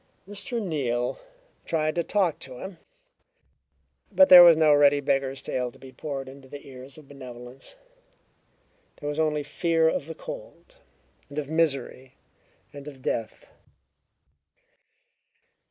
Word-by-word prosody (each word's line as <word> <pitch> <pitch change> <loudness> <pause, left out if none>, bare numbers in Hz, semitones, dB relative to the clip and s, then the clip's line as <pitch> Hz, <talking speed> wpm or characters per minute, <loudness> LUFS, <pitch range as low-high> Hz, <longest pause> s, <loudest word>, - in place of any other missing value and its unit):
Mr. 205 +4 -4
Neal 130 - -2 0.4
tried 155 -1 -1
to 170 - 0
talk 185 -3 0
to 130 -2 -10
him, 190 +3 -9 1.3
but 285 - +5
there 180 -1 +12
was 170 -2 +8
no 155 -2 +5
ready 145 0 +5
beggar's 135 -1 -1
tale 125 -1 -3
to - - -19
be 130 - -13
poured 135 +1 -6
into 135 0 -13
the 140 +1 -11
ears 130 +1 -11
of 150 -3 -15
benevolence; 125 - -11 1.2
there 145 - -8
was 150 +1 -4
only 150 -2 0
fear 165 +2 +1
of 155 -2 -1
the 160 - -7
cold, - - -10 0.5
and 145 - -11
of 150 -1 -4
misery, 135 -5 -1 0.6
and 145 0 -10
of 135 -3 -11
death. 115 - -3
145 Hz, 135 wpm, -26 LUFS, 135-165 Hz, 1.3 s, there